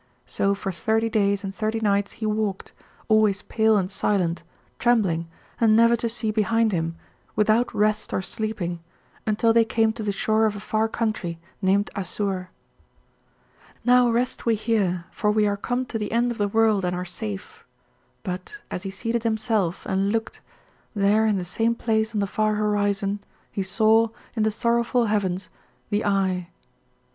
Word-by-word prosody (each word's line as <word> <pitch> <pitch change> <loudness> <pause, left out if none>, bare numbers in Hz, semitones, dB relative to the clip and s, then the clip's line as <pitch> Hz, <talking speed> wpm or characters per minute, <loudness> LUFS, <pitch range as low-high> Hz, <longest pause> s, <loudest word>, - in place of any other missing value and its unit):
So 200 0 0
for 195 -1 -4
thirty 220 +5 0
days 200 -2 +1
and 195 -1 -4
thirty 220 +2 -1
nights 200 -2 +1
he 225 - -5
walked, 210 -2 -2 0.3
always 215 -2 +3
pale 220 -1 +2
and 190 -1 -1
silent, 180 -4 0 0.4
trembling, 195 -9 +2 0.3
and 220 -2 +5
never 230 +1 +6
to 230 0 -2
see 225 -1 -1
behind 225 +1 +2
him, 165 -2 -1 0.4
without 215 +3 +3
rest 215 +1 0
or - - 0
sleeping, 190 -6 -3 0.5
until 220 +2 +3
they 230 0 +6
came 225 0 +1
to 220 - -7
the 210 -1 -1
shore 220 +2 +2
of 210 - -2
a - - -6
far 215 +2 0
country, 215 -8 -2 0.2
named 200 +2 +2
Assur. 190 -1 -3 1.4
"'Now 250 0 +5
rest 240 +2 0
we 230 -1 +2
here, 200 -6 0
for 210 - 0
we 210 0 +3
are 205 -1 +1
come 245 +5 -2
to 225 -2 -4
the 210 - -3
end 240 +2 +2
of 235 - -6
the 205 - +2
world 220 -1 +3
and 180 0 0
are 180 +1 -3
safe,' 105 - -7 0.6
but, 185 - -5 0.2
as 180 - -3
he 195 - -5
seated 230 +4 -2
himself 220 -5 0
and 195 +1 0
looked, 225 0 -3 0.5
there 205 +2 +3
in 210 -2 +2
the 180 - -3
same 225 +6 0
place 220 -1 0
on 205 - +1
the - - +1
far 215 +1 0
horizon 205 -1 0 0.3
he 200 - -2
saw, 220 +4 +3 0.3
in 220 - 0
the 215 - +3
sorrowful 235 +2 +1
heavens, 195 -3 -1 0.4
the 205 +1 +1
Eye. 190 -3 0
215 Hz, 170 wpm, -24 LUFS, 195-225 Hz, 1.4 s, never